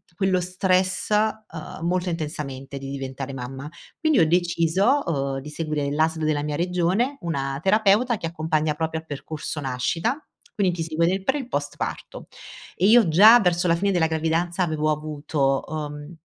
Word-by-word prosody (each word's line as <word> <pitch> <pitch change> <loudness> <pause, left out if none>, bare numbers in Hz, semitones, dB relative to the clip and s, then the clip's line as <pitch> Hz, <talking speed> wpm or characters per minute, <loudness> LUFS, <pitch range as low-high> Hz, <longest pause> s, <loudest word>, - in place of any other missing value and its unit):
quello 190 -1 +1
stress, 185 +1 0
ehm, 215 -6 -2
molto 180 +1 0
intensamente 145 -4 -5
di 135 0 -7
diventare 135 0 -5
mamma. 135 +2 -6 0.3
Quindi 315 -3 +3
ho 160 - +5
deciso, 175 - +2
umh, 140 -4 -2
di 145 +3 -9
seguire 150 -2 -2
l'ASL 160 +2 0
della 150 -1 0
mia 150 -1 -2
regione 180 - 0
una 135 -4 -2
terapeuta 215 +4 +3
che 165 - -4
accompagna 155 -2 -1
proprio 160 +1 -2
a - - -13
percorso 150 0 -6
nascita, 165 - -1 0.3
quindi 190 -4 +1
ti 165 - -2
segue 165 +1 0
nel 190 +2 0
pre 295 - +1
e - - -3
il 250 - -10
post 145 -11 -3
parto - - -6 0.5
e 185 - +1
io 225 -1 +6
già 210 +9 +8
verso 180 -3 +1
la 165 - +4
fine 200 +4 0
della 175 -4 +2
gravidanza 165 +3 -1
avevo 155 -2 0
avuto, 150 -2 -1
umh, 150 +1 -6
165 Hz, 170 wpm, -24 LUFS, 150-185 Hz, 0.5 s, già